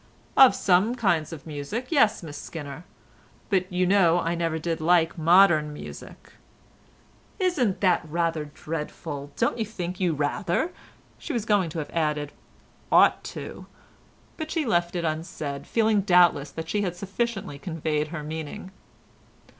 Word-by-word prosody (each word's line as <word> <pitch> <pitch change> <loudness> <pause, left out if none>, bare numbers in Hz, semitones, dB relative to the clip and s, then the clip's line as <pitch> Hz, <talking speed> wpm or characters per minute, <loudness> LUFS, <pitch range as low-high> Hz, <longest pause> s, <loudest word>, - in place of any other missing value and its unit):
"Of 265 -2 +8
some 195 +6 +3
kinds 175 -10 +1
of 160 -4 -9
music, 160 - -5
yes, 220 - +3
Miss 150 -3 -8
Skinner, 145 +2 -8 0.7
but 185 -1 +1
you 180 0 +1
know 180 -3 +4
I 170 0 -1
never 165 -1 -1
did 165 0 -3
like 165 +1 +3
modern 170 -2 +5
music." 150 - -10 1.1
"Isn't 300 - 0
that 185 -3 +3
rather 165 -1 -1
dreadful?—Don't 150 +5 -4
you 220 - 0
think 180 -4 -5
you 180 -3 +1
rather"—she 175 - -3
was 230 -4 -2
going 205 -6 +2
to 160 - -7
have 150 - -4
added, 150 -3 -1 0.6
"ought - - +5
to?" - - -8 0.7
but 315 -1 -5
she 320 -3 -1
left 175 -6 +1
it 170 -1 -1
unsaid, 155 -3 -4
feeling 220 -2 +2
doubtless 175 -6 +4
that 160 0 -7
she 205 +4 0
had 180 -3 -2
sufficiently 195 -4 -3
conveyed 155 -2 -2
her 155 -1 -6
meaning. 160 +5 -6
170 Hz, 140 wpm, -25 LUFS, 155-200 Hz, 1.1 s, Of